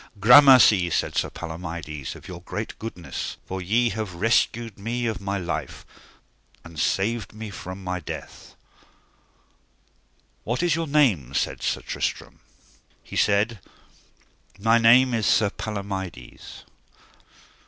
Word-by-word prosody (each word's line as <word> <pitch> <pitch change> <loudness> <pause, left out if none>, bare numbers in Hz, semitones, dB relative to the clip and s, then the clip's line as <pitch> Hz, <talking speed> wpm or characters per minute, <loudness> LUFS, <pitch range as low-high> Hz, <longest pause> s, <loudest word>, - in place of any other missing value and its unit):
Gramercy, 125 -5 +7
said - - -1
Sir - - 0
Palomides, 80 -5 -7
of - - -13
your - - -9
great - - -5
goodness, 110 -6 -6
for 95 0 -5
ye 115 +6 +2
have 105 -4 -5
rescued 115 +2 0
me 120 +4 -3
of 110 -3 -3
my 100 0 -2
life, 85 -4 -5 0.8
and 85 -2 -10
saved 110 +7 -1
me 110 -1 -8
from 95 0 -8
my 90 0 -3
death. 80 - -9 1.9
What 120 +8 -2
is 175 -3 +2
your 165 0 -2
name? 110 - +2
said - - -1
Sir - - -1
Tristram. - - -4 0.6
He - - -10
said: 105 +2 +2 1.0
My 115 +3 +3
name 120 +3 +5
is 110 -4 0
Sir 105 -2 +3
Palomides. 95 - -7
100 Hz, 120 wpm, -24 LUFS, 90-115 Hz, 1.9 s, Gramercy